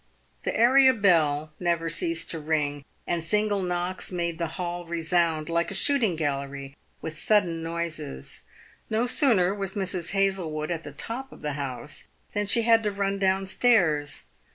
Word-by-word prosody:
The - - -2
area 260 +2 +6
bell 155 -7 +2
never 170 -2 0
ceased 335 - 0
to 165 - -2
ring, 150 -2 -1 0.2
and 170 -2 -1
single 210 +2 +1
knocks 180 +1 -2
made 170 -2 -2
the 170 - 0
hall 175 -1 -3
resound, 165 -2 +1
like 170 0 0
a 200 - -5
shooting 230 - +2
gallery, 140 -2 -3 0.3
with 155 -1 -5
sudden 180 -6 +2
noises. 165 - -4 0.5
No 220 +2 +1
sooner 230 - +3
was 195 0 -4
Mrs. 185 -3 -2
Hazlewood 185 -6 0
at 165 -2 -3
the 145 - -8
top 235 - -6
of - - -14
the 150 -1 -2
house 140 0 -5 0.3
than 205 -1 -1
she 230 +3 +3
had 230 0 +5
to 210 -2 -1
run 200 0 -1
down 190 0 +2
stairs. 175 -10 +2
175 Hz, 160 wpm, -26 LUFS, 155-205 Hz, 0.5 s, area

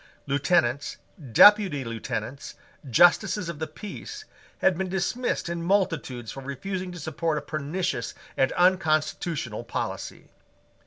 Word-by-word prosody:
Lieutenants, 140 -2 +1 0.3
Deputy 195 - +7
Lieutenants, 115 +2 -5 0.3
Justices 175 - +4
of 160 -3 -6
the 160 - -2
Peace, 220 - -8 0.3
had 190 - +3
been 190 +2 -3
dismissed 195 +7 -1
in 170 0 -3
multitudes 165 - 0
for 135 - -8
refusing 180 +8 -5
to 175 - -8
support 160 +1 -2
a - - -2
pernicious 160 +5 -3 0.2
and 135 - +2
unconstitutional 155 - +1
policy. 115 - -5
165 Hz, 115 wpm, -26 LUFS, 140-185 Hz, 0.3 s, Deputy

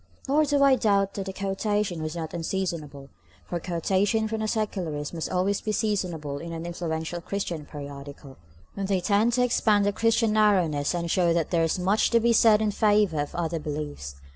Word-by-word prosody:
Nor 300 +3 +3
do 285 -1 +2
I 275 -1 +6
doubt 200 -4 +2
that 195 -1 -5
the - - -3
quotation 195 -2 -2
was 155 +1 -4
not 160 -2 -5
unseasonable, 165 -5 -4 0.4
for 175 - -3
quotations 195 +6 0
from 220 -1 -2
the 215 - -1
Secularist 180 -10 -2
must 165 -2 -4
always 190 +2 0
be 215 - -2
seasonable 175 -10 -2
in 170 +3 -7
an 165 0 -5
influential 170 0 -4
Christian 170 -5 -4
periodical, 140 -1 -9 0.4
when 195 -1 -3
they 195 -1 +1
tend 205 +6 +2
to 250 +1 +3
expand 215 -4 +2
the 205 - +1
Christian 225 0 +2
narrowness, 180 -9 +2
and 170 -1 -2
show 175 -2 +3
that 165 -2 -1
there 170 -2 +2
is 165 - 0
much 190 +4 +2
to 235 - +4
be 235 +1 +3
said 220 -1 +5
in 210 - +1
favor 205 -7 +2
of 145 - -6
other 165 -1 -2
beliefs. 145 - -5
185 Hz, 190 wpm, -26 LUFS, 160-210 Hz, 0.4 s, I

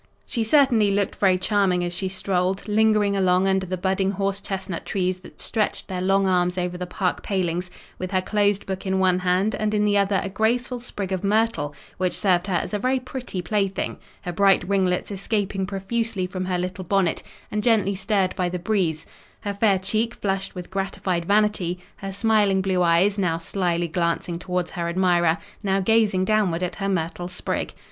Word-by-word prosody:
She 230 - -1
certainly 230 -4 +4
looked 200 -1 0
very 190 -2 +4
charming 185 -2 +1
as 175 0 -3
she 190 +2 -2
strolled, 190 +1 -1
lingering 210 -1 +3
along 185 0 +3
under 190 -1 +1
the 185 +1 -2
budding 190 +1 0
horse 195 +1 -2
chestnut 190 -3 -4
trees 185 -2 -1
that 185 - -15
stretched 215 -2 -1
their 185 -2 -3
long 195 +1 +3
arms 180 -1 +1
over 180 0 -1
the 180 0 -5
park 180 0 -1
palings; 180 -2 -1 0.3
with 185 - -3
her 190 -1 +2
closed 205 0 +1
book 190 0 -4
in 190 0 +1
one 185 -1 +3
hand, 185 +4 +1
and 215 0 -1
in 210 0 +2
the 205 -1 +3
other 195 0 +2
a - - -3
graceful 240 +5 0
sprig 205 -5 -6
of 190 0 -2
myrtle, 205 -8 +1 0.2
which 185 -1 0
served 185 -2 +2
her 190 - 0
as 175 - -2
a 205 - 0
very 255 +4 +1
pretty 250 -7 -5
plaything; 195 -1 -1 0.2
her 175 - -3
bright 195 -1 +3
ringlets 190 -1 +1
escaping 195 -1 -1
profusely 200 +1 -2
from 185 0 -4
her 185 -1 0
little 185 +1 -3
bonnet, 185 -1 +1 0.3
and 210 - 0
gently 215 -4 +3
stirred 195 -1 0
by 180 -1 0
the 180 - -3
breeze, 175 -4 -1 0.4
her 205 -1 -3
fair 200 -1 +3
cheek 215 +5 -1
flushed 195 -1 -2
with 180 0 -8
gratified 190 -2 -2
vanity, 200 -3 +2 0.2
her 195 0 -5
smiling 205 -1 +2
blue 190 -2 +1
eyes, 180 +4 +3
now 170 -4 +1
slyly 175 0 -1
glancing 170 0 -1
towards 180 -1 -2
her 170 -2 -3
admirer, 175 -2 +3 0.2
now 195 -1 +1
gazing 200 -2 +3
downward 190 -5 +1
at 180 - -3
her 195 -1 -1
myrtle 175 -1 -2
sprig. 180 0 -3
190 Hz, 190 wpm, -24 LUFS, 180-205 Hz, 0.4 s, certainly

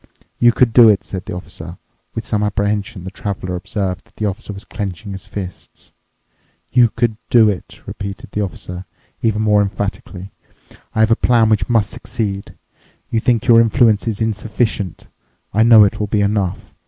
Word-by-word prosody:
"You 120 0 +6
could 120 -1 +2
do 115 -2 +8
it," 100 -2 +2
said 95 -1 -6
the - - -5
Officer. 85 -1 -8 0.4
With 115 - -4
some 110 -4 -1
apprehension 105 0 -1
the 95 - -7
Traveler 95 -3 -4
observed 90 0 -3
that - - -29
the 110 - -3
Officer 105 +2 -4
was 100 +1 -9
clenching 100 -1 -5
his 95 -1 -8
fists. 95 -4 -9 0.8
"You 120 -2 +5
could 110 -1 -1
do 115 -3 +6
it," 95 - -9
repeated 100 0 -7
the 105 - -2
Officer, 90 -2 -5 0.4
even 110 -1 +1
more 105 -1 +4
emphatically. 100 -1 -4 0.6
"I 110 - +2
have 110 +1 +4
a - - +6
plan 115 -2 +3
which 105 -3 +1
must 115 -4 +2
succeed. 100 -3 -4 0.6
You 115 - +2
think 120 0 +1
your 115 -1 +7
influence 115 -1 +3
is 110 -1 -2
insufficient. 110 -3 -2 0.5
I 105 - +3
know 115 -1 +8
it 100 - +1
will 105 - -1
be 105 0 +1
enough. 100 -2 -1
105 Hz, 175 wpm, -18 LUFS, 95-115 Hz, 0.8 s, do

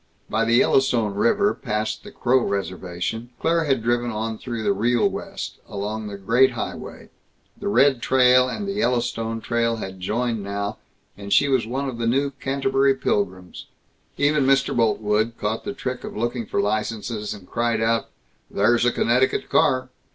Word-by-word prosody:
By 115 +1 +1
the 115 +1 +3
Yellowstone 120 -5 +3
River, 200 - +2
past 105 +1 -3
the - - -10
Crow 130 +1 +2
reservation, 95 +2 -3
Claire 165 0 +1
had 135 -5 +1
driven 120 +1 +1
on 110 0 -3
through 120 -3 -5
the 100 -1 +2
Real 115 +4 +2
West, - - -6
along 105 +2 -4
the 100 -1 -6
Great 120 +7 +3
Highway. - - -6 0.5
The - - -6
Red 125 +4 +4
Trail 125 0 +4
and 200 +10 -4
the - - -1
Yellowstone 120 - -1
Trail 115 0 0
had 95 -4 -7
joined 115 +4 -1
now 100 +1 -4 0.4
and 100 0 -9
she 145 - +5
was 130 -5 +1
one 135 +4 -2
of 125 -3 -5
the 115 - 0
new 140 +4 +1
Canterbury 135 0 +1
Pilgrims. 95 -7 -2 0.5
Even 145 -1 +2
Mr. 135 -1 +3
Boltwood 110 -1 +1
caught 110 +2 -3
the 205 - -2
trick 125 -9 -5
of - - -7
looking 120 0 -2
for - - -1
licenses, 105 0 -2
and 95 -3 -14
cried, 115 -1 0 0.7
"There's 120 +4 +2
a 125 - +4
Connecticut 125 +3 +1
car!" 130 0 +2
115 Hz, 165 wpm, -23 LUFS, 105-130 Hz, 0.7 s, she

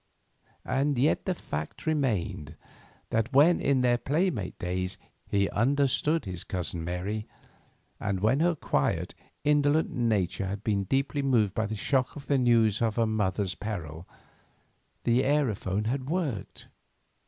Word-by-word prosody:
And 140 0 +1
yet 140 +5 +2
the 185 - 0
fact 75 - -6
remained 110 - -1 0.6
that 115 +3 0
when, 150 +6 +5
in 135 -2 +2
their 120 -1 +3
playmate 145 - -1
days, 90 +1 -3 0.3
he 100 -1 +2
understood 140 +6 +1
his 90 -2 -4
cousin 90 -2 -3
Mary, 95 +5 -3 0.7
and 100 -2 -1
when 110 +8 +2
her 170 +1 +3
quiet, - - -1 0.3
indolent 150 +1 +3
nature 100 -6 0
had 100 +2 -5
been 100 -3 0
deeply 135 +6 0
moved 115 -8 +2
by 110 +1 -1
the 110 - -4
shock 130 +4 0
of 145 -2 -9
the 140 -2 +2
news 115 -4 +3
of 110 -2 +1
her 115 - +2
mother's 100 -3 0
peril, 85 -6 -6 1.0
the 120 +1 +3
aerophone 110 -8 0
had 130 +3 -2
worked. 150 - -3
115 Hz, 140 wpm, -28 LUFS, 100-140 Hz, 1.0 s, when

